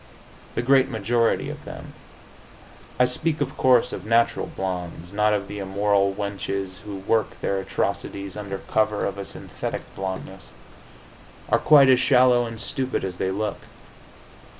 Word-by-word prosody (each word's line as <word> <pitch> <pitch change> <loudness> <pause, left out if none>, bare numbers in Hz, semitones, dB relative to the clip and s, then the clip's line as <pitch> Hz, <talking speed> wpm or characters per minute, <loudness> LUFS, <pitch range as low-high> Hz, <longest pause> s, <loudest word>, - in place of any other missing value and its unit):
The 115 - 0
great 135 +1 +4
majority 115 0 +1
of - - -10
them - - -9 1.1
I 125 - +6
speak, 150 +5 -1
of 135 -2 -2
course, 125 -2 +4
of - - -5
natural 115 +2 +2
blondes; 90 -1 -5
not 105 +1 +3
of 100 -1 0
the 105 - -6
immoral 100 0 +1
wenches 100 -1 -3
who 105 -1 -7
work 105 +3 0
their 100 - -1
atrocities 100 0 -3
under 100 -2 -5
cover 105 +1 0
of 100 0 -3
a 100 - -4
synthetic - - -6
blondeness 95 0 -6 1.0
are - - +4
quite 145 -3 +7
as 130 -1 +6
shallow 125 -2 +4
and 115 -1 -8
stupid 130 +1 -2
as 90 -2 -4
they 95 - -1
look. 100 +1 -2
105 Hz, 150 wpm, -24 LUFS, 95-120 Hz, 1.1 s, quite